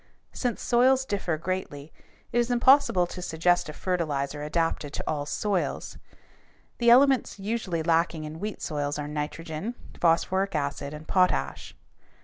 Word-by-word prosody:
Since 245 -3 -2
soils 255 +2 +3
differ 195 -7 -2
greatly, 160 -4 -5 0.4
it 240 - +2
is 240 0 +1
impossible 245 -6 +5
to 180 +1 -8
suggest 175 0 +1
a - - -6
fertilizer 150 -5 -2
adapted 150 -1 -1
to - - -3
all 145 -2 -2
soils. 200 +3 -2 0.8
The 235 -1 +4
elements 265 0 +5
usually 195 -5 -2
lacking 165 -1 +1
in 155 +1 -7
wheat 210 +2 -5
soils 145 -1 -2
are 145 0 -4
nitrogen, 155 +7 -4 0.2
phosphoric 190 +3 +2
acid, 140 -1 -2
and 150 +1 -11
potash. 185 -1 0
175 Hz, 135 wpm, -27 LUFS, 150-210 Hz, 0.8 s, impossible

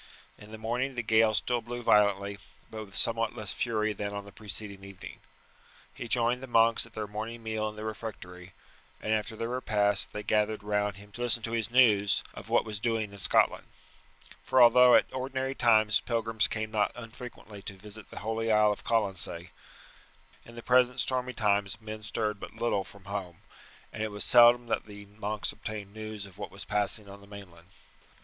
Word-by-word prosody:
In 105 - -15
the 110 - -8
morning 125 +4 -2
the 120 - -2
gale 110 0 +3
still 120 +2 0
blew 120 +1 -7
violently, 100 -2 +2 0.3
but 110 -1 -6
with 100 0 -15
somewhat 115 +1 +2
less 105 -3 -2
fury 110 -2 -1
than 100 0 -5
on 100 0 -6
the 100 - -12
preceding 100 -1 -4
evening. 100 -1 -10 0.7
He 120 - -7
joined 120 +1 +1
the 130 - -7
monks 115 -1 +4
at 115 - -21
their 110 - -4
morning 110 +3 -6
meal 110 -1 -2
in 105 - -11
the 105 0 -7
refectory, 95 -5 -8 0.5
and 110 - -1
after 110 +1 -2
their 115 +1 -4
repast 105 -5 0
they 105 - -6
gathered 105 0 0
round 105 -1 -1
him 105 +1 -14
to 120 - -9
listen 120 -1 +2
to 115 - -2
his 115 -2 -1
news 110 -5 +4
of - - -11
what - - +2
was 105 -2 -4
doing 110 -2 -1
in 100 - -11
Scotland; - - +3 0.8
for 130 - +2
although 125 +1 +8
at - - +5
ordinary 130 +1 -3
times 110 -4 +4
pilgrims 115 -2 +1
came 110 0 -4
not 105 -1 +1
unfrequently 115 -3 -10
to 100 -1 -8
visit 105 +1 -12
the - - -9
holy 115 +1 -1
isle 105 -1 +4
of 105 - -5
Colonsay, 95 -6 -1 0.9
in 115 - -14
the 120 - -9
present 125 0 +3
stormy 125 -1 -1
times 100 -3 0
men 110 -1 -8
stirred 105 -1 -3
but - - -9
little 110 -5 0
from 100 0 -16
home, 95 -4 -6 0.5
and 110 - -6
it 110 - -1
was 105 0 +1
seldom 120 0 +7
that 115 - -2
the 105 -1 -11
monks 105 +1 -3
obtained 105 -2 -7
news 110 -1 -7
of 100 0 -15
what - - -5
was 100 -1 -9
passing 105 0 0
on 100 0 -12
the 100 - -16
mainland. 90 -4 -13
110 Hz, 195 wpm, -29 LUFS, 100-115 Hz, 0.9 s, although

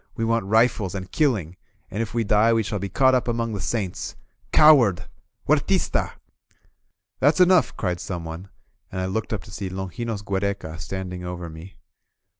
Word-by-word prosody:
We 115 - -1
want 115 -3 +1
rifles 110 -3 +2
and 95 -1 -6
killing, 105 - 0 0.3
and 105 - -2
if 115 - -3
we 115 -1 0
die 105 +2 +4
we 115 -1 +2
shall 105 0 -3
be 100 +1 -4
caught 130 +6 +4
up 125 -1 +1
among 115 -1 -1
the 100 - -3
saints! 95 -2 -3 0.4
Coward! 120 - +6 0.4
Huer - - +3
tista! - - +1
• - - -1
• - - -12 0.6
." - - -53
"That's 145 +5 +3
enough!'' 180 -6 +4
cried 90 -2 -1
someone, 85 +1 -6 0.4
and 95 - -4
I 95 - -1
looked 100 +4 -3
up 105 -4 -3
to 105 - -14
see 95 -1 -5
Longinos 100 +4 -4
Giiereca 95 -5 -3
standing 90 +1 -5
over 90 -1 -6
me. 85 +3 -11
100 Hz, 185 wpm, -24 LUFS, 90-115 Hz, 0.6 s, Coward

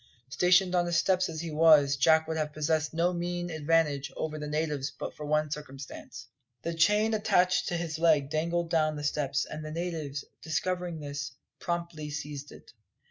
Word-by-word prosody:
Stationed 180 +7 +4
on 175 -1 +3
the 175 - -3
steps 185 +2 +2
as 160 -1 -5
he 170 -1 -5
was, 150 -3 +6
Jack 160 +4 +4
would 160 - -2
have 155 -1 -2
possessed 155 0 0
no 170 +2 +1
mean 175 0 -3
advantage 150 -3 +1
over 155 -1 -3
the 150 - -5
natives 150 -2 -1
but 140 - -7
for 150 - -7
one 150 0 +1
circumstance. 135 -4 -8 0.4
The 170 - -2
chain 210 +7 +3
attached 180 -4 +2
to 175 - -1
his 165 -2 -4
leg 155 -4 +3
dangled 170 +2 -1
down 155 -2 +2
the 150 - -6
steps, 145 -1 0
and 155 +1 -7
the 155 - -6
natives, 155 -4 -4 0.2
discovering 175 0 -2
this, 140 -2 -5 0.3
promptly 170 -3 -3
seized 150 -1 -6
it. - - -15
160 Hz, 180 wpm, -29 LUFS, 150-170 Hz, 0.4 s, was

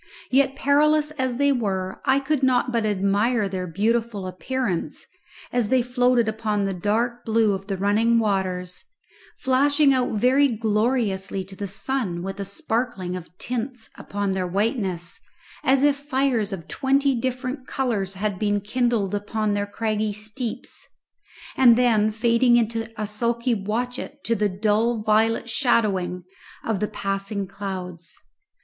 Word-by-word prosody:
Yet 270 +1 +3
perilous 300 +2 +3
as 260 -5 -2
they 285 +1 +3
were, 190 -7 -2
I 270 - +4
could 275 0 -1
not 255 -1 +2
but 230 -3 +1
admire 205 +3 +1
their 185 -1 -4
beautiful 215 +2 0
appearance 185 +2 -3 0.5
as 240 -4 +1
they 255 -2 +3
floated 245 -1 +2
upon 215 -2 -1
the 195 -1 -1
dark 225 +6 -1
blue 220 -2 +2
of 195 0 -5
the 195 -2 -2
running 215 +4 +3
waters, 185 -4 -1 0.6
flashing 280 +2 +4
out 255 -3 0
very 255 +6 +4
gloriously 215 -4 0
to 190 +1 -9
the 200 +1 -4
sun 200 -3 -2
with 195 +1 -5
a 200 - -3
sparkling 210 - -2
of 180 0 -9
tints 245 -1 -4
upon 200 -1 -3
their 185 -1 -1
whiteness 190 -3 -1 0.4
as 265 +1 +3
if 290 -1 +4
fires 265 -6 0
of 170 -5 -6
twenty 275 - +2
different 255 +2 -3
colours 210 -8 -1
had 200 -1 -2
been 205 -1 +1
kindled 220 -2 0
upon 205 +1 -1
their 205 0 -1
craggy 215 0 -1
steeps, 220 +4 -5 0.7
and 245 -3 +7
then 225 -4 +3
fading 235 +2 +3
into 225 0 -1
a 215 - -1
sulky 235 +3 0
watchet 245 +7 -3
to 230 - +1
the 210 -2 +1
dull 215 +3 +1
violet 220 +2 +2
shadowing 205 -8 +1 0.4
of 220 -4 0
the 210 - 0
passing 195 0 -3
clouds. 185 -3 -7
220 Hz, 145 wpm, -24 LUFS, 195-250 Hz, 0.7 s, and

